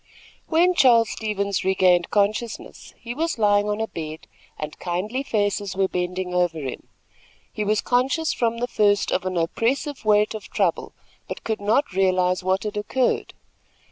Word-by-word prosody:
When 345 Hz, +3 st, +3 dB
Charles 235 Hz, -8 st, +5 dB
Stevens 200 Hz, -3 st, -2 dB
regained 185 Hz, -2 st, +3 dB
consciousness, 215 Hz, +3 st, -2 dB
he 235 Hz, 0 st, -7 dB
was 325 Hz, +2 st, -2 dB
lying 205 Hz, -1 st, +3 dB
on 210 Hz, +1 st, -1 dB
a 220 Hz, -, 0 dB
bed, 155 Hz, -3 st, -7 dB, 0.3 s
and 150 Hz, 0 st, -7 dB
kindly 190 Hz, +9 st, -2 dB
faces 205 Hz, -5 st, -1 dB
were 190 Hz, 0 st, +2 dB
bending 180 Hz, 0 st, -3 dB
over 175 Hz, -2 st, +1 dB
him. 135 Hz, -4 st, -6 dB, 0.7 s
He 210 Hz, -, -2 dB
was 210 Hz, 0 st, +1 dB
conscious 260 Hz, +6 st, +1 dB
from 235 Hz, -1 st, 0 dB
the 245 Hz, +1 st, -2 dB
first 205 Hz, -3 st, +2 dB
of 185 Hz, 0 st, 0 dB
an 185 Hz, -1 st, -2 dB
oppressive 245 Hz, -, -1 dB
weight 210 Hz, 0 st, +3 dB
of 215 Hz, -3 st, -8 dB
trouble, 190 Hz, -6 st, -1 dB, 0.3 s
but -, -, -7 dB
could 220 Hz, -2 st, -3 dB
not 215 Hz, +3 st, +1 dB
realize 185 Hz, -1 st, +2 dB
what 190 Hz, +1 st, 0 dB
had 210 Hz, 0 st, -4 dB
occurred. 245 Hz, +5 st, -1 dB
205 Hz, 160 wpm, -23 LUFS, 185-230 Hz, 0.7 s, Charles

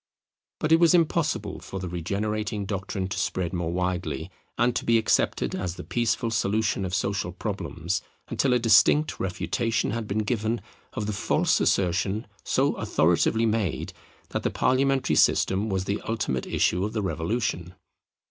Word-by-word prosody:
But 155 Hz, -, -1 dB
it 165 Hz, -, +7 dB
was 170 Hz, +1 st, +6 dB
impossible 155 Hz, -, 0 dB
for 95 Hz, -, -7 dB
the 95 Hz, -, -4 dB
regenerating 100 Hz, +4 st, -2 dB
doctrine 95 Hz, -1 st, -3 dB
to -, -, -3 dB
spread 85 Hz, 0 st, -1 dB
more 85 Hz, -2 st, -2 dB
widely 90 Hz, -3 st, -2 dB, 0.3 s
and 120 Hz, 0 st, +2 dB
to -, -, -1 dB
be 115 Hz, 0 st, +4 dB
accepted 110 Hz, -, +1 dB
as 90 Hz, -2 st, -3 dB
the -, -, -8 dB
peaceful 115 Hz, 0 st, 0 dB
solution 105 Hz, -2 st, 0 dB
of 90 Hz, 0 st, -2 dB
social 100 Hz, -2 st, -1 dB
problems, 90 Hz, -2 st, -3 dB, 0.3 s
until 135 Hz, -, +1 dB
a -, -, +5 dB
distinct 120 Hz, +6 st, +4 dB
refutation 115 Hz, +4 st, -1 dB
had 115 Hz, -1 st, -3 dB
been 105 Hz, +2 st, 0 dB
given 115 Hz, +1 st, -1 dB, 0.3 s
of 105 Hz, -, -3 dB
the 105 Hz, -, -2 dB
false 100 Hz, -, +1 dB
assertion 95 Hz, +4 st, +1 dB, 0.2 s
so -, -, +2 dB
authoritatively 90 Hz, +7 st, +2 dB
made 110 Hz, -5 st, -1 dB, 0.4 s
that -, -, -2 dB
the -, -, 0 dB
parliamentary 135 Hz, +1 st, +2 dB
system 100 Hz, +3 st, +3 dB
was 95 Hz, -2 st, 0 dB
the 100 Hz, +2 st, -2 dB
ultimate 100 Hz, -, -1 dB
issue 90 Hz, +2 st, +1 dB
of 105 Hz, +2 st, -2 dB
the 110 Hz, -2 st, -1 dB
Revolution. 90 Hz, -1 st, -2 dB
100 Hz, 155 wpm, -26 LUFS, 90-115 Hz, 0.4 s, it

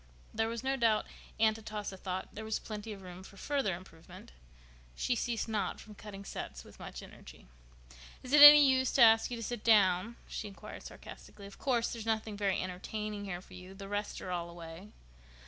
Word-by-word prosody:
There 225 Hz, +1 st, 0 dB
was 230 Hz, +1 st, -5 dB
no 270 Hz, +1 st, 0 dB
doubt 225 Hz, -3 st, +2 dB, 0.3 s
Aunt 220 Hz, 0 st, +3 dB
Atossa 210 Hz, -2 st, -6 dB
thought 185 Hz, 0 st, -5 dB
there 220 Hz, -, -7 dB
was 220 Hz, 0 st, -1 dB
plenty 215 Hz, 0 st, -7 dB
of 195 Hz, -2 st, -9 dB
room 180 Hz, 0 st, -10 dB
for 195 Hz, +1 st, -14 dB
further 270 Hz, -7 st, -1 dB
improvement. 165 Hz, -, -13 dB, 0.6 s
She 250 Hz, -, 0 dB
ceased 235 Hz, 0 st, -2 dB
not 210 Hz, -4 st, -2 dB
from 215 Hz, -, -12 dB
cutting 200 Hz, -1 st, -10 dB
sets -, -, -7 dB
with -, -, -16 dB
much -, -, -8 dB
energy. -, -, -14 dB, 0.8 s
"Is 255 Hz, +2 st, -6 dB
it 295 Hz, -, +8 dB
any 295 Hz, -1 st, +12 dB
use 260 Hz, -1 st, +2 dB
to 265 Hz, -, +6 dB
ask 225 Hz, 0 st, +6 dB
you 240 Hz, -, -4 dB
to 230 Hz, -, -6 dB
sit 240 Hz, -1 st, -5 dB
down?" 205 Hz, 0 st, +4 dB
she 215 Hz, -, -5 dB
inquired 195 Hz, -, -10 dB
sarcastically. 200 Hz, -, -11 dB
"Of 200 Hz, -, -12 dB
course, 240 Hz, -4 st, 0 dB
there's 225 Hz, -1 st, -7 dB
nothing 220 Hz, -1 st, -1 dB
very 200 Hz, -2 st, 0 dB
entertaining 205 Hz, +3 st, -5 dB
here 180 Hz, -2 st, -5 dB
for -, -, -17 dB
you. 185 Hz, +1 st, -11 dB
The 195 Hz, 0 st, -9 dB
rest 205 Hz, +1 st, -3 dB
are 185 Hz, -, -6 dB
all 170 Hz, -1 st, -3 dB
away." 170 Hz, +2 st, -10 dB
210 Hz, 200 wpm, -32 LUFS, 190-230 Hz, 0.8 s, any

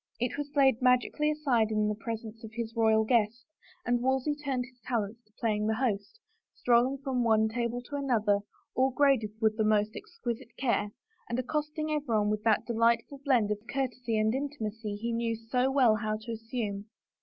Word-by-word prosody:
It 245 Hz, +1 st, -1 dB
was 290 Hz, 0 st, -5 dB
laid 270 Hz, -3 st, +4 dB
magically 250 Hz, +4 st, +3 dB
aside 270 Hz, -8 st, +1 dB
in 215 Hz, -1 st, +1 dB
the 210 Hz, -, +1 dB
presence 225 Hz, 0 st, -6 dB
of 225 Hz, -, -7 dB
his 230 Hz, -1 st, -4 dB
royal 220 Hz, -1 st, +4 dB
guest 235 Hz, +1 st, +1 dB, 0.4 s
and 245 Hz, 0 st, +1 dB
Wolsey 265 Hz, +3 st, +1 dB
turned 275 Hz, -4 st, -2 dB
his 255 Hz, -1 st, -20 dB
talents 230 Hz, -1 st, -2 dB
to 215 Hz, -, -33 dB
playing 215 Hz, -2 st, 0 dB
the 220 Hz, -, +1 dB
host, 220 Hz, -, -2 dB, 0.4 s
stroll 240 Hz, 0 st, +4 dB
ing -, -, -5 dB
from 260 Hz, -3 st, 0 dB
one 220 Hz, -1 st, +4 dB
table 240 Hz, +1 st, -2 dB
to 285 Hz, +3 st, -5 dB
another, 220 Hz, -7 st, +2 dB, 0.3 s
all 260 Hz, +1 st, +3 dB
graded 270 Hz, -5 st, +3 dB
with 220 Hz, -1 st, +2 dB
the 220 Hz, -, +2 dB
most 215 Hz, 0 st, +2 dB
exquisite 235 Hz, 0 st, -6 dB
care, 235 Hz, -5 st, +1 dB, 0.4 s
and 235 Hz, -, -1 dB
accosting 300 Hz, +3 st, -2 dB
everyone 230 Hz, -9 st, +1 dB
with 210 Hz, 0 st, -1 dB
that 220 Hz, -2 st, +3 dB
delight 230 Hz, 0 st, +3 dB
ful 280 Hz, -, -10 dB
blend 245 Hz, -7 st, +3 dB
of 210 Hz, -, -1 dB
courtesy 250 Hz, -4 st, -1 dB
and 215 Hz, +1 st, +2 dB
intimacy 225 Hz, -6 st, -4 dB
he 230 Hz, +3 st, -3 dB
knew 230 Hz, 0 st, 0 dB
so 250 Hz, +3 st, 0 dB
well 255 Hz, -5 st, +4 dB
how 215 Hz, 0 st, -2 dB
to 230 Hz, +2 st, -7 dB
assume. 225 Hz, -3 st, -4 dB
235 Hz, 190 wpm, -30 LUFS, 220-260 Hz, 0.4 s, laid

